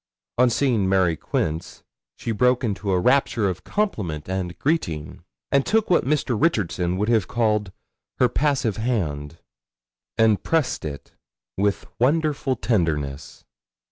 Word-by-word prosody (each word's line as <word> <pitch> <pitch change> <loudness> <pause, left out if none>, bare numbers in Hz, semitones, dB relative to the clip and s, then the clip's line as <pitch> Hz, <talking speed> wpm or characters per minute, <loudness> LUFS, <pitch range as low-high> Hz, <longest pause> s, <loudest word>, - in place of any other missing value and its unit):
On 125 0 +6
seeing 115 -6 +1
Mary 95 -4 +3
Quince 80 +1 -3 0.3
she 115 - -3
broke 125 +3 +2
into 100 -3 -2
a 90 -1 +2
rapture 120 -1 +2
of 90 -3 -4
compliment 100 - -2
and 95 -2 -3
greeting, 85 - -2 0.3
and 140 0 +4
took 220 +2 +1
what 175 - +4
Mr. 135 -3 0
Richardson 90 - +1
would 105 +2 0
have 110 -5 +2
called 105 -4 0 0.5
her 125 - +4
passive 130 -4 0
hand, 80 - -2 0.8
and 110 -2 +4
pressed 155 - 0
it 70 -2 -7 0.4
with 100 +1 0
wonderful 145 0 +1
tenderness. 75 - -2
110 Hz, 130 wpm, -23 LUFS, 90-130 Hz, 0.8 s, On